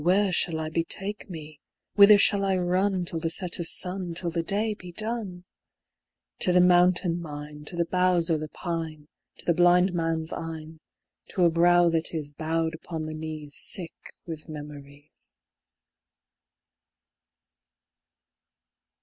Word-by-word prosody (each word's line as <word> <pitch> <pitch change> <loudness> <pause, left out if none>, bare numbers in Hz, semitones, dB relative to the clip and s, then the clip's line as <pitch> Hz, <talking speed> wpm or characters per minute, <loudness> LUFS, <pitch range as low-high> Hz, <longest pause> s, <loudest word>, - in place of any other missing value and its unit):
Where 190 +2 +3
shall 165 -2 +1
I 155 0 -3
betake 195 +6 -3
me? 155 -3 -9 0.3
Whither 205 0 +8
shall 200 0 +4
I 190 -1 +1
run 185 +1 0
Till 165 -1 -2
the 165 0 -2
set 180 +1 -2
of 170 - -3
sun, 180 -1 -2
Till 170 0 +1
the 165 0 -1
day 210 +6 0
be 180 -3 -11
done? 215 -2 -3 1.0
To 180 - +3
the 180 - +5
mountain 180 -1 +3
mine, 150 -1 -8
To 175 - -3
the 170 0 0
boughs 180 -1 +2
o' 160 - +2
the 155 0 -6
pine, 160 -4 -5 0.3
To - - -14
the 170 - +3
blind 175 +2 +4
man's 165 -1 -2
eyne, 160 -1 -7 0.5
To 185 - 0
a 170 - +4
brow 175 +1 +4
that 165 0 -1
is 145 -2 -4
Bowed 160 +2 -1
upon 160 -1 -6
the 155 - -5
knees, 155 -2 -6
Sick 170 +2 +1 0.3
with 160 -2 -8
memories. 145 - -10
170 Hz, 145 wpm, -26 LUFS, 160-180 Hz, 1.0 s, Whither